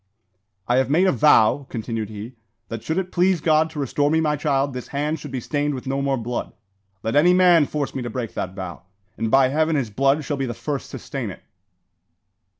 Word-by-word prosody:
"I 120 Hz, -, +3 dB
had 130 Hz, -1 st, +2 dB
made 170 Hz, +6 st, +4 dB
a 190 Hz, -, +4 dB
vow," 135 Hz, 0 st, +4 dB
continued 115 Hz, -2 st, -4 dB
he, 110 Hz, +3 st, -8 dB, 0.4 s
"that 115 Hz, -1 st, -5 dB
should 160 Hz, +7 st, -2 dB
it 185 Hz, -1 st, -2 dB
please 180 Hz, 0 st, +2 dB
God 155 Hz, 0 st, +3 dB
to 160 Hz, -, -7 dB
restore 145 Hz, +1 st, +1 dB
me 160 Hz, +1 st, +2 dB
my 150 Hz, -2 st, +1 dB
child, 140 Hz, -2 st, 0 dB
this 125 Hz, -1 st, -6 dB
hand 150 Hz, +2 st, -2 dB
should 145 Hz, -, -8 dB
be 130 Hz, -1 st, -3 dB
stained 145 Hz, +3 st, -1 dB
with 130 Hz, -, -7 dB
no 135 Hz, +1 st, -1 dB
more 135 Hz, -1 st, 0 dB
blood. 120 Hz, +1 st, -4 dB, 0.5 s
Let 115 Hz, -, -1 dB
any 175 Hz, +5 st, +5 dB
man 175 Hz, -5 st, +5 dB
force 145 Hz, -2 st, -3 dB
me 135 Hz, -, -3 dB
to 120 Hz, -, -4 dB
break 115 Hz, -1 st, -4 dB
that 95 Hz, +1 st, -4 dB
vow, 95 Hz, -4 st, -6 dB, 0.3 s
and, 115 Hz, -, -2 dB
by 135 Hz, +1 st, +5 dB
Heaven, 155 Hz, +3 st, +1 dB
his 125 Hz, -7 st, -1 dB
blood 135 Hz, +6 st, +2 dB
shall 145 Hz, -, -2 dB
be 135 Hz, -1 st, -2 dB
the 120 Hz, -, -4 dB
first 135 Hz, +4 st, -4 dB
to -, -, -6 dB
stain -, -, -5 dB
it!" -, -, -10 dB
140 Hz, 225 wpm, -22 LUFS, 120-155 Hz, 0.5 s, any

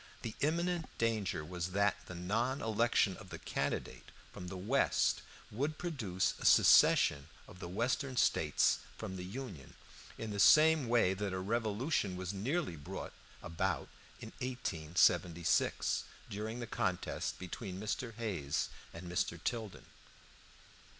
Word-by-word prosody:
The 115 Hz, -, -4 dB
imminent 170 Hz, +3 st, 0 dB
danger 110 Hz, -9 st, 0 dB
was 90 Hz, +1 st, -4 dB
that 100 Hz, +1 st, +3 dB
the 90 Hz, -, -7 dB
non 115 Hz, +10 st, -1 dB
election 110 Hz, -4 st, +2 dB
of -, -, -12 dB
the -, -, -6 dB
candidate -, -, -3 dB, 0.2 s
from 90 Hz, -, -7 dB
the 95 Hz, +1 st, -6 dB
West 115 Hz, +10 st, +2 dB, 0.3 s
would 145 Hz, +8 st, -2 dB
produce 115 Hz, -, -1 dB
a -, -, -8 dB
secession 70 Hz, +1 st, +6 dB, 0.2 s
of 90 Hz, -, -13 dB
the 85 Hz, -, -6 dB
Western 125 Hz, +6 st, -1 dB
States -, -, +3 dB, 0.2 s
from 95 Hz, -, -5 dB
the 90 Hz, -, -5 dB
Union, 95 Hz, -, -8 dB, 0.4 s
in 110 Hz, -1 st, -5 dB
the 100 Hz, -, -4 dB
same 155 Hz, +6 st, +6 dB
way 115 Hz, -6 st, +4 dB
that 100 Hz, 0 st, -3 dB
a 95 Hz, -, -2 dB
revolution 110 Hz, -, -1 dB
was 95 Hz, +1 st, -4 dB
nearly 130 Hz, -, -1 dB
brought 70 Hz, -, -7 dB, 0.3 s
about 80 Hz, 0 st, -2 dB, 0.3 s
in -, -, -8 dB
1876, 85 Hz, -7 st, +1 dB, 0.3 s
during 110 Hz, +3 st, -4 dB
the 120 Hz, -, -4 dB
contest 90 Hz, -5 st, -2 dB
between 95 Hz, +1 st, -6 dB
Mr. 110 Hz, +2 st, -3 dB
Hayes 95 Hz, -12 st, -2 dB, 0.3 s
and 85 Hz, +2 st, -8 dB
Mr. 85 Hz, -1 st, -1 dB
Tilden. 110 Hz, -5 st, -3 dB
105 Hz, 135 wpm, -34 LUFS, 90-120 Hz, 0.4 s, secession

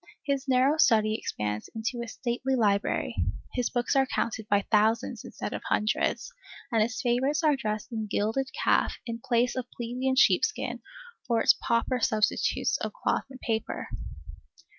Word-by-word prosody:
His 280 Hz, -1 st, -1 dB
narrow 265 Hz, +3 st, +3 dB
study 215 Hz, -5 st, +4 dB
expands 105 Hz, -, -3 dB
into 235 Hz, +2 st, -3 dB
a -, -, -7 dB
stately 255 Hz, +3 st, -2 dB
library, 200 Hz, -, +1 dB, 0.4 s
his 250 Hz, -2 st, 0 dB
books 245 Hz, +2 st, 0 dB
are 270 Hz, -1 st, +4 dB
counted 220 Hz, -3 st, -2 dB
by 205 Hz, -1 st, +2 dB
thousands 220 Hz, +2 st, +2 dB
instead -, -, -6 dB
of -, -, -4 dB
hundreds, 215 Hz, -, 0 dB, 0.4 s
and 225 Hz, -2 st, +3 dB
his 235 Hz, +5 st, 0 dB
favorites 270 Hz, +4 st, +1 dB
are 300 Hz, -2 st, +4 dB
dressed 215 Hz, -2 st, -4 dB
in 220 Hz, -2 st, -3 dB
gilded 225 Hz, +6 st, 0 dB
calf -, -, +3 dB
in 230 Hz, -1 st, -4 dB
place 245 Hz, -1 st, +1 dB
of 250 Hz, -1 st, -4 dB
plebeian 250 Hz, +2 st, -2 dB
sheepskin 430 Hz, +11 st, +2 dB, 0.5 s
or 230 Hz, -1 st, +3 dB
its -, -, +6 dB
pauper 235 Hz, +2 st, 0 dB
substitutes 215 Hz, -2 st, +1 dB
of -, -, -4 dB
cloth -, -, -1 dB
and 260 Hz, -1 st, -12 dB
paper. 225 Hz, -2 st, -3 dB
235 Hz, 155 wpm, -28 LUFS, 220-260 Hz, 0.5 s, its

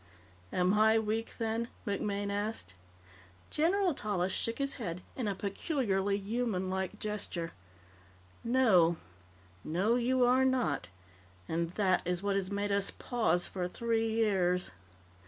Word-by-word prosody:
"Am 180 Hz, +1 st, +2 dB
I 220 Hz, +1 st, +5 dB
weak, 220 Hz, +1 st, -1 dB
then?" 225 Hz, +1 st, -1 dB, 0.2 s
MacMaine 200 Hz, -1 st, -1 dB
asked. 205 Hz, -, -2 dB, 0.8 s
General 360 Hz, +3 st, +2 dB
Tallis 190 Hz, -7 st, -1 dB
shook 230 Hz, -, -1 dB
his 275 Hz, 0 st, -1 dB
head 180 Hz, -3 st, -4 dB
in 245 Hz, -5 st, -2 dB
a 200 Hz, -, -1 dB
peculiarly 200 Hz, -, 0 dB
humanlike 195 Hz, -3 st, -2 dB
gesture. 200 Hz, -6 st, -3 dB, 0.9 s
"No. 215 Hz, -9 st, +4 dB, 0.7 s
No, 195 Hz, +9 st, +1 dB
you 250 Hz, +1 st, +3 dB
are 255 Hz, +2 st, +4 dB
not. 245 Hz, -, +1 dB, 0.6 s
And 165 Hz, +1 st, -1 dB
that 185 Hz, -3 st, +2 dB
is 180 Hz, +1 st, -2 dB
what 200 Hz, -1 st, +1 dB
has 195 Hz, -1 st, 0 dB
made 200 Hz, 0 st, -1 dB
us 200 Hz, 0 st, +2 dB
pause 180 Hz, -8 st, +1 dB
for 180 Hz, -2 st, -3 dB
three 225 Hz, +3 st, 0 dB
years." 190 Hz, -5 st, +1 dB
205 Hz, 125 wpm, -32 LUFS, 185-230 Hz, 0.9 s, I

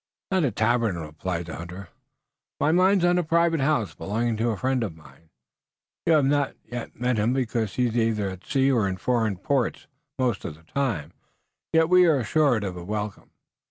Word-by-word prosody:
"Not 190 Hz, -3 st, +2 dB
a -, -, +2 dB
tavern," 110 Hz, -2 st, +1 dB
replied 85 Hz, +2 st, -4 dB
the 85 Hz, -, -7 dB
hunter. 90 Hz, +2 st, -8 dB, 0.7 s
"My 155 Hz, -, +3 dB
mind's 185 Hz, +1 st, +4 dB
on 175 Hz, 0 st, +3 dB
a -, -, 0 dB
private 165 Hz, 0 st, +2 dB
house, 135 Hz, -, +1 dB
belonging 110 Hz, -, -2 dB
to 115 Hz, +2 st, +1 dB
a 110 Hz, -, -1 dB
friend 130 Hz, 0 st, 0 dB
of 85 Hz, -7 st, -5 dB
mine. 80 Hz, 0 st, -18 dB, 0.8 s
You 165 Hz, -, +5 dB
have 150 Hz, -3 st, +4 dB
not 145 Hz, 0 st, +1 dB, 0.4 s
met 125 Hz, -2 st, 0 dB
him 110 Hz, +4 st, +2 dB
because 115 Hz, -5 st, -1 dB
he 125 Hz, -1 st, +2 dB
is 115 Hz, -2 st, +1 dB
at 95 Hz, -2 st, -4 dB
sea 135 Hz, -1 st, +2 dB
or 115 Hz, -6 st, +2 dB
in 95 Hz, -1 st, -3 dB
foreign 110 Hz, -2 st, 0 dB
parts 130 Hz, +6 st, -1 dB, 0.3 s
most 125 Hz, -6 st, 0 dB
of 75 Hz, -, -5 dB
the 80 Hz, -, -21 dB
time. 90 Hz, -, -2 dB, 0.6 s
Yet 160 Hz, 0 st, +4 dB
we 180 Hz, 0 st, +6 dB
are 155 Hz, -3 st, +4 dB
assured 130 Hz, -1 st, +2 dB
of 95 Hz, -3 st, -4 dB
a 90 Hz, -, -7 dB
welcome." 105 Hz, +1 st, -5 dB
115 Hz, 190 wpm, -25 LUFS, 95-140 Hz, 0.8 s, we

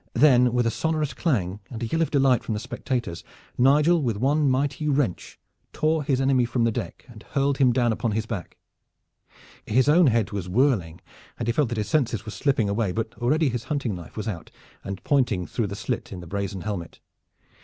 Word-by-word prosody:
Then, 125 Hz, -1 st, +5 dB
with 120 Hz, 0 st, +1 dB
a 115 Hz, -, +2 dB
sonorous 155 Hz, +1 st, -1 dB
clang, 100 Hz, -, -1 dB
and 115 Hz, 0 st, -6 dB
a -, -, 0 dB
yell 160 Hz, +9 st, -1 dB
of 165 Hz, -, +1 dB
delight 135 Hz, -4 st, +3 dB
from 110 Hz, -, -3 dB
the -, -, -2 dB
spectators, 120 Hz, -5 st, -4 dB, 0.3 s
Nigel 150 Hz, +6 st, +4 dB
with 115 Hz, -6 st, -1 dB
one 140 Hz, +5 st, +2 dB
mighty 140 Hz, +3 st, 0 dB
wrench 140 Hz, -10 st, -1 dB, 0.3 s
tore 155 Hz, 0 st, +1 dB
his 135 Hz, -2 st, 0 dB
enemy 135 Hz, -2 st, +3 dB
from 120 Hz, 0 st, 0 dB
the 115 Hz, -, +2 dB
deck -, -, -6 dB
and 115 Hz, -4 st, -13 dB
hurled 140 Hz, +2 st, -1 dB
him 130 Hz, -3 st, +5 dB
down 120 Hz, -2 st, +2 dB
upon 110 Hz, 0 st, -2 dB
his 110 Hz, +1 st, -1 dB
back. 100 Hz, -6 st, -6 dB, 1.1 s
His 130 Hz, +5 st, +3 dB
own 165 Hz, +2 st, +6 dB
head 115 Hz, -4 st, +1 dB
was 95 Hz, -3 st, -4 dB
whirling 100 Hz, -, +1 dB, 0.4 s
and 115 Hz, -, -4 dB
he -, -, +3 dB
felt 125 Hz, +1 st, +1 dB
that 120 Hz, -, -3 dB
his 105 Hz, -, -1 dB
senses 120 Hz, -, 0 dB
were 110 Hz, -, -6 dB
slipping 130 Hz, -5 st, +1 dB
away, 100 Hz, -1 st, 0 dB
but 110 Hz, +3 st, -3 dB
already 145 Hz, +5 st, +2 dB
his 120 Hz, -2 st, -4 dB
hunting 140 Hz, -7 st, -2 dB
knife 85 Hz, +1 st, -10 dB
was 110 Hz, -, -4 dB
out 90 Hz, -6 st, -5 dB, 0.3 s
and 100 Hz, 0 st, -6 dB
pointing 120 Hz, -10 st, +1 dB
through 115 Hz, +3 st, -2 dB
the 100 Hz, -, -5 dB
slit -, -, -4 dB
in 95 Hz, -, -6 dB
the 85 Hz, -, -9 dB
brazen 100 Hz, +1 st, -4 dB
helmet. 95 Hz, -5 st, -5 dB
120 Hz, 210 wpm, -25 LUFS, 105-140 Hz, 1.1 s, own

